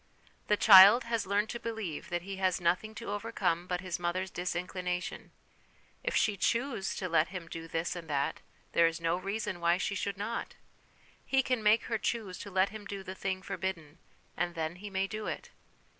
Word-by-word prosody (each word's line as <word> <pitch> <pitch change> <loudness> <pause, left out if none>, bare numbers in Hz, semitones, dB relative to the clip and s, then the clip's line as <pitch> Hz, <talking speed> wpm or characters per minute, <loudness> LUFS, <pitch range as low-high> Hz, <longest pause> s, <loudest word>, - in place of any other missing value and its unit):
The 210 - +3
child 200 +4 +9
has 230 -3 -2
learned 205 +2 +1
to 235 - -4
believe 215 -5 -5
that 175 -1 -2
he 195 +1 -6
has 185 -1 +1
nothing 180 +5 0
to 230 -2 -5
overcome 200 -5 -1
but 180 -1 -2
his 185 -2 -4
mother's 175 +2 -2
disinclination; 180 0 -3 0.7
if - - -1
she 210 - +3
choose 235 -1 0
to 185 - -3
let 165 -1 +3
him 180 -4 -7
do 165 0 -7
this 165 +2 -2
and 165 -2 -8
that, 140 -1 -1 0.3
there 170 - +5
is 165 0 -3
no 165 0 +1
reason 195 0 -3
why 170 +1 +3
she 195 - -1
should 200 0 -3
not; 215 +4 -4 0.7
he 270 0 +2
can 250 -3 0
make 215 +2 +4
her 225 -2 -2
choose 210 -6 -2
to 200 - -7
let 190 0 +2
him 215 0 -9
do 200 -1 -6
the 185 - -6
thing 190 0 -3
forbidden, 180 -5 -4 0.4
and 175 0 -2
then 160 +1 -3
he 205 +2 -7
may 190 0 0
do 215 +1 -5
it. - - -5
190 Hz, 195 wpm, -31 LUFS, 175-210 Hz, 0.7 s, child